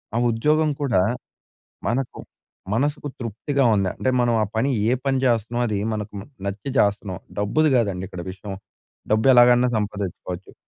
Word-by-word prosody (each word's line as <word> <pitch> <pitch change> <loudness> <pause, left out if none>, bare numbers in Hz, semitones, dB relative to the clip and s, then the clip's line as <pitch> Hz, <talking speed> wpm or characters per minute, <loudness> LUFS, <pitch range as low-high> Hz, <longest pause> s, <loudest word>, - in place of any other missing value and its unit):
ఆ - - +2
ఉద్యోగం 150 +7 +2
కూడా 120 -10 +2 0.9
మనకు 125 +2 -1 0.6
మనసుకు 145 +4 -1
తృప్తిగా 125 +4 -1
ఉందా! 95 -2 +1
అంటే 130 - +1
మనం 120 -1 +2
ఆ - - +3
పని 120 +5 +2 0.2
ఏ - - +3
పని 135 -1 +1
జేస్తన్నామో 120 0 +1
అది 105 -2 -1
మనకు 105 0 -5 0.3
నచ్చి 100 +7 -4
చేస్తన్నాం. 100 -3 +1 0.2
డబ్బుది 150 +10 +2
గాదండి 100 -6 0
ఇక్కడ 90 -3 -7
విషయం. 100 +1 -7 0.6
డబ్బు 110 +3 +2
ఎలాగైనా 120 0 +6
సంపాదిచ్చుకోవచ్చు. 100 -3 -4
115 Hz, 140 wpm, -23 LUFS, 100-130 Hz, 0.9 s, ఎలాగైనా